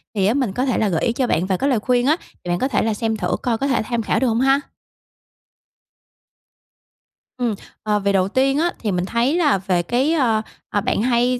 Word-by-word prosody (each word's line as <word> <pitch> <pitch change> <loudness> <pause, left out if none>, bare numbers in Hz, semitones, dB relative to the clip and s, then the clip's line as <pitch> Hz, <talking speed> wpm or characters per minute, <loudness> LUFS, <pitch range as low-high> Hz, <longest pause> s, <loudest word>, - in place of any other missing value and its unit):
Thì 195 -2 +1
á, 210 - +3
mình 255 -7 -1
có 255 +6 0
thể 255 - 0
là 215 - +1
gợi 165 -4 -1
ý 235 - +1
cho 255 +1 0
bạn 175 - +1
vài 190 -1 0
cái 275 - 0
lời 250 -5 +2
khuyên 245 +2 +1
á, 305 +4 +3 0.3
thì 175 - -6
bạn 175 - 0
có 260 - +1
thể 275 - 0
là 220 -1 0
xem 220 +1 -2
thử - - -1
coi 235 -2 0
có 275 - -1
thể 260 -5 +1
tham 235 0 -1
khảo 215 - 0
được 260 - +1
không 230 +1 +1
ha? 270 +1 +4 2.8
Ừm, 240 -3 0 0.3
ờ, 210 -1 +1
về 200 0 0
đầu 190 -1 +2
tiên 270 +6 +1
á, 345 +2 +1
thì 215 - -2
mình 180 -1 -1
thấy 235 - +1
là 295 - +3
về 185 -2 0
cái, 255 - +1
ơ, 235 -9 +2 0.3
ờ, 205 - 0
bạn - - 0
hay, 245 +1 +2
235 Hz, 240 wpm, -20 LUFS, 205-260 Hz, 2.8 s, ha